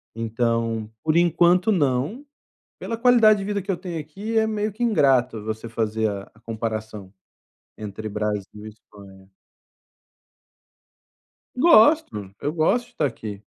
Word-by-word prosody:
Então, 115 -1 -1
por 155 0 +1
enquanto, 175 +3 +3
não, 150 - 0 0.5
pela 230 - -4
qualidade 230 -3 +5
de - - -4
vida 205 0 -2
que 195 - -5
eu 190 - 0
tenho 170 -2 -6
aqui 200 +9 -6
é 220 - +2
meio 215 -1 -2
que 220 +5 -7
ingrato 130 - +2
você 110 +1 -5
fazer 110 -1 -1
a 100 -1 -5
a 105 - -23
comparação, 110 -3 -5 0.7
entre 110 0 -6
Brasil 105 -1 -3 0.2
e - - -6
Espanha. 100 -3 -17 2.3
Gosto, 250 - +4
eu 145 - -2
gosto 170 +10 +1
de - - -23
estar 155 - 0
aqui. 105 -5 -6
125 Hz, 135 wpm, -23 LUFS, -, 2.3 s, qualidade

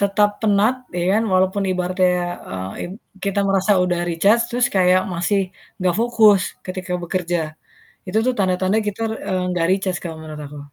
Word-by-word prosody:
tetap 205 +1 +2
penat 215 +2 +3 0.2
ya 175 - 0
kan, - - +1
walaupun 190 +2 +2
ibaratnya, 185 0 +1 0.4
eee, 95 +1 -5 0.2
id 180 - -8 0.3
kita 200 0 0
merasa 195 +1 +3
udah 180 -1 0
recharge, 200 +8 +3
terus 245 +1 +2
kayak 185 -1 +4
masih 185 +2 0 0.3
nggak 180 -1 +2
fokus, 220 -5 +5 0.2
ketika 185 0 -5
bekerja. 175 -3 -2 0.5
Itu 210 +4 +1
tuh 255 - +2
tanda-tanda 185 +1 +1
kita, 210 +2 -4 0.3
eee, 185 -1 0
nggak 170 -2 +1
recharge, 190 -2 0
kalau 165 -2 -6
menurut 155 -1 -8
aku. 145 0 -9
185 Hz, 160 wpm, -21 LUFS, 175-200 Hz, 0.5 s, fokus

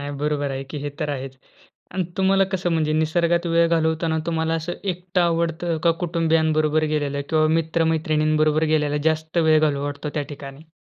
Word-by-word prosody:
नाही, 145 0 -5
बरोबर 145 -1 -1
आहे, 135 0 -4
की 140 +3 -7
हे 145 +1 -4
तर 150 - -1
आहेच 135 -1 -5 0.6
आणि 185 -2 0
तुम्हाला 195 0 +3
कसं 180 -2 -1
म्हणजे 155 -2 +1
निसर्गात 170 +2 +1
वेळ 170 0 +3
घालवताना 160 0 +1
तुम्हाला 160 -1 0
असं 165 +2 -3
एकट 180 0 -3
आवडत 170 -1 +1 0.2
का, 170 - +6
कुटुंबियांबरोबर 160 -2 +1
गेलेल्या 140 -1 -1
किंवा 155 -1 +3
मित्र-मैत्रिणींबरोबर 155 -1 +1
गेल्याला 150 -1 +1
जास्त 160 +2 -3
वेळ 155 -2 +4
घालू 145 -2 +1
वाटतो 145 +1 -4
त्या 150 - 0
ठिकाणी? 140 +2 -10
160 Hz, 165 wpm, -22 LUFS, 150-170 Hz, 0.6 s, का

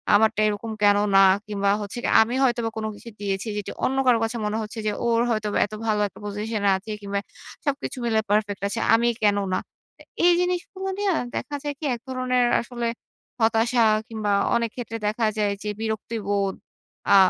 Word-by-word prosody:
আমারটা 220 0 +3
এরকম 210 +2 -3
কেন 205 0 +6 0.2
না? - - +8 0.3
কিংবা 200 -1 0
হচ্ছে 205 +3 -6
গিয়ে, - - +1
আমি 225 +2 +1
হয়তোবা 240 -3 +1
কোন 220 - -2
কিছু 230 - -11
দিয়েছি 195 +1 -2
যেটি 205 - -4
অন্য 265 - 0
কারো 245 -2 +6
কাছে 225 +2 -2
মনে 210 +1 -1
হচ্ছে 220 +1 -6
যে, - - +2
ওর 230 0 +3
হয়তো 215 -2 0
বা - - +2
এত 205 - -12
ভালো 215 -1 +1
একটা - - -15
পজিশন 210 +1 -3
এ - - +6
আছে 215 +3 -8
কিংবা 200 0 -2 0.5
সবকিছু 285 -1 -2
মিলে 225 -2 +2
পারফেক্ট 205 -2 +1
আছে। 225 - -3
আমি 235 +1 +4 0.2
কেন 205 -1 +4 0.2
না? - - +2 0.4
এ - - -13 0.2
এই 350 - +7
জিনিসগুলো 360 +2 -2
নিয়ে 405 -1 +1 0.2
দেখা 295 - -3
যায় 290 -1 -2
কি 310 - -5
এক 235 - -12
ধরনের 255 -1 +1 0.2
আসলে, 240 0 -5 0.5
হতাশা 230 +2 +3 0.2
কিংবা 215 -2 -2 0.2
অনেক 235 -1 +1
ক্ষেত্রে 230 -2 -5
দেখা 220 +2 0
যায় 205 -1 +1
যে, 210 - -5
বিরক্তিবোধ, 205 -3 -1 0.6
আ - - +9
225 Hz, 190 wpm, -24 LUFS, 205-240 Hz, 0.6 s, আ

